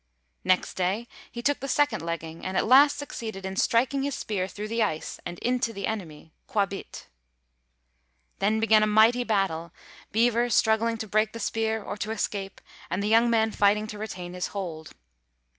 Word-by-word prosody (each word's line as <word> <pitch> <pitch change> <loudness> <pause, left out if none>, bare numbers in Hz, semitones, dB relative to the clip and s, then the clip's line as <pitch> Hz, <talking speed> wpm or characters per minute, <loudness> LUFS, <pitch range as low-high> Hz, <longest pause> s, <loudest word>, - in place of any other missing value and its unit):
Next 185 0 +2
day 190 +6 -1 0.2
he 235 0 -7
took 290 +2 +1
the 275 - -5
second 290 +2 +1
legging, 165 -1 -5
and 185 0 -2
at - - +2
last 280 +4 +6
succeeded 225 -9 -6
in 190 0 -4
striking 250 +7 +2
his 280 0 -2
spear 190 -4 -2
through 205 +2 -6
the 230 +1 0
ice 160 -8 -2
and 175 0 -7
into 245 +1 0
the 200 -2 -4
enemy, 165 -7 -6 0.2
Quābīt. 200 -5 -2 1.3
Then 215 +3 +2
began 220 -1 +5
a 215 - +3
mighty 220 +4 +5
battle, 190 -7 -1 0.4
Beaver 235 +2 +2
struggling 230 0 +2
to 220 - -5
break 215 +2 +1
the 230 - -6
spear 220 0 -1
or 205 - -5
to 210 - -4
escape, 200 -3 -3 0.3
and 200 - -1
the 210 - 0
young 230 +2 +5
man 220 -1 +2
fighting 210 +1 +3
to 210 - -9
retain 180 -5 -6
his 180 0 -3
hold. 165 -6 -6
215 Hz, 175 wpm, -26 LUFS, 190-230 Hz, 1.3 s, last